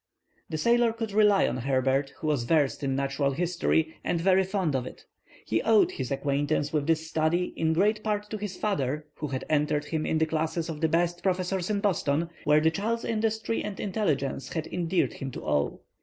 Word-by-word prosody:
The 155 - -2
sailor 235 +5 +3
could 225 -2 -4
rely 205 -1 +4
on 125 - -2
Herbert, 135 +2 +1
who 175 - -7
was 145 -6 +1
versed 150 -1 +2
in 135 -2 -1
Natural 140 0 0
History 165 0 0
and 170 - 0
very 190 +2 +4
fond 190 -6 -1
of 130 -1 -1
it. - - -11 0.4
He 110 - 0
owed 220 -2 +4
his 130 -3 -4
acquaintance 145 +2 0
with 150 -1 0
this 160 -1 +1
study 160 +3 0
in 160 0 +1
great 210 +5 +2
part 210 -1 -1
to 215 - -2
his 205 -3 -5
father, 150 -7 -1
who 150 - -3
had 130 -2 -4
entered 150 -1 +1
him 155 0 -2
in 160 - +1
the 160 - +3
classes 160 +1 -2
of 155 -1 -5
the 160 - +2
best 175 +2 +1
professors 185 0 -1
in 205 -1 0
Boston, 170 -4 0
where 150 +1 +5
the 160 +1 +3
child's 225 +6 -2
industry 220 0 -1
and 210 -2 -5
intelligence 160 -10 -1
had 160 -2 -2
endeared 175 0 0
him 135 - -5
to - - -7
all. 75 -1 -1
160 Hz, 200 wpm, -27 LUFS, 145-195 Hz, 0.4 s, where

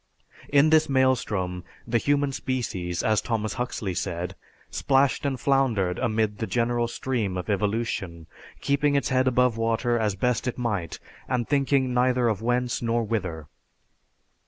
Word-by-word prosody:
In 145 +2 +4
this 155 -2 +4
maelstrom, 110 -9 +1 0.2
the 115 0 +1
human 145 +2 +1
species, 110 -10 -3
as 110 -1 +2
Thomas 110 -2 -2
Huxley 120 -6 -3
said 85 +1 -3 0.5
'plashed 135 +1 +3
and 135 -2 -2
floundered 115 -11 +1
amid 110 -4 0
the 110 - -2
general 120 +3 0
stream 115 -6 -2
of 90 +4 -3
evolution, 100 -4 -2 0.4
keeping 140 +1 +1
its 140 - +1
head 130 0 +2
above 125 -2 +2
water 115 +1 +1
as 105 -3 0
best 125 +4 0
it 125 - -2
might, 100 - -2 0.3
and 125 -2 -1
thinking 135 -2 +1
neither 125 0 +2
of 110 -2 -2
whence 120 +1 0
nor 115 0 0
whither.' 95 -8 -3
120 Hz, 145 wpm, -25 LUFS, 105-130 Hz, 0.5 s, In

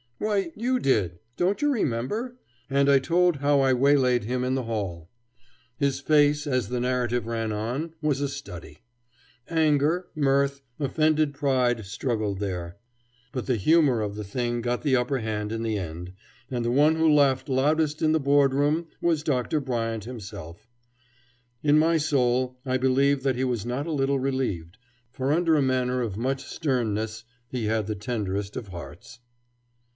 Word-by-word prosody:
"Why, 200 -3 -1
you 250 +4 0
did. 95 - +1 0.2
Don't 190 +7 +1
you 295 - +3
remember?" 215 - -2 0.3
And 140 +1 +3
I 140 - +7
told 175 +3 +2
how 145 0 +2
I 135 -1 +3
waylaid 130 -2 +3
him 125 +3 -2
in 130 +1 0
the 130 - -1
hall. 95 -8 -4 0.7
His 140 -1 0
face, 145 0 +3
as 130 -7 -1
the 125 0 -2
narrative 125 -2 0
ran 115 -1 -2
on, 125 +10 -3
was 145 -3 +1
a 140 - +1
study. 90 - -9 0.7
Anger, 160 +2 +2
mirth, 140 -1 +1 0.2
offended 155 +1 +1
pride, 125 -5 +1
struggled 105 -2 -2
there; 90 -3 -4 0.5
but 125 - -4
the 130 - +2
humor 140 - +3
of 105 -1 -3
the 105 - -5
thing 120 +3 -2
got 120 +1 -1
the 140 -4 +3
upper 130 +2 0
hand 105 -2 -3
in 115 0 -3
the 110 -2 -1
end, 90 0 -6 0.4
and 125 -2 -2
the 120 - +1
one 150 +5 +4
who 160 -1 +3
laughed 140 -1 +3
loudest 150 +3 +1
in 155 - +3
the 160 - +3
Board 140 -1 +3
room 150 +4 +1
was 165 -3 +1
Dr. 135 0 0
Bryant 115 -5 -3
himself. 105 -5 -9 1.0
In 150 0 +4
my 165 +2 +4
soul 130 -4 +1
I 130 -1 +1
believe 135 +2 +2
that 135 -2 +1
he 130 - -1
was 120 -4 -1
not 130 +6 -2
a - - -2
little 140 -2 +1
relieved, 115 -10 -2 0.3
for 130 +1 -2
under 165 0 +3
a 150 - +3
manner 130 -1 0
of 105 -5 -3
much 135 +3 -1
sternness 110 -6 -2 0.3
he 125 -4 -3
had 110 0 0
the 110 - -3
tenderest 100 -2 -3
of 115 -6 -6
hearts. 90 +6 -10
130 Hz, 170 wpm, -26 LUFS, 115-145 Hz, 1.0 s, I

